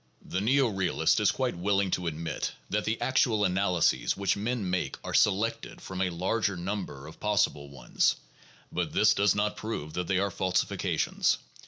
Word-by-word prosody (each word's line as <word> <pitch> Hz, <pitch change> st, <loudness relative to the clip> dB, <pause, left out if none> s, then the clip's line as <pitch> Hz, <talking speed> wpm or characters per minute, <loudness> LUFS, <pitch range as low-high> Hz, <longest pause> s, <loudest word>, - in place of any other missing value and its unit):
The 95 Hz, -, -2 dB
neo 130 Hz, +5 st, +3 dB
realist 95 Hz, -3 st, +1 dB
is -, -, +3 dB
quite -, -, -1 dB
willing 100 Hz, +2 st, +1 dB
to 90 Hz, -1 st, -1 dB
admit 80 Hz, 0 st, -3 dB, 0.2 s
that 105 Hz, +1 st, 0 dB
the 110 Hz, +2 st, -1 dB
actual 115 Hz, -5 st, +2 dB
analy 90 Hz, -2 st, +1 dB
ses -, -, +2 dB
which 100 Hz, -2 st, +1 dB
men 110 Hz, 0 st, -2 dB
make 90 Hz, 0 st, -2 dB
are -, -, -5 dB
selected 105 Hz, +3 st, +1 dB
from 95 Hz, 0 st, -5 dB
a 95 Hz, -, +1 dB
larger 95 Hz, +3 st, -1 dB
number 90 Hz, -7 st, -4 dB
of 80 Hz, -, -12 dB
possible 105 Hz, -9 st, 0 dB
ones, 70 Hz, -2 st, 0 dB, 0.6 s
but -, -, -2 dB
this 105 Hz, 0 st, +5 dB
does 100 Hz, -2 st, +3 dB
not 105 Hz, +1 st, 0 dB
prove 90 Hz, -9 st, -5 dB
that 90 Hz, -1 st, -3 dB
they 95 Hz, -, +1 dB
are 100 Hz, +1 st, 0 dB
falsifications. 90 Hz, +1 st, 0 dB
95 Hz, 175 wpm, -28 LUFS, 90-105 Hz, 0.6 s, this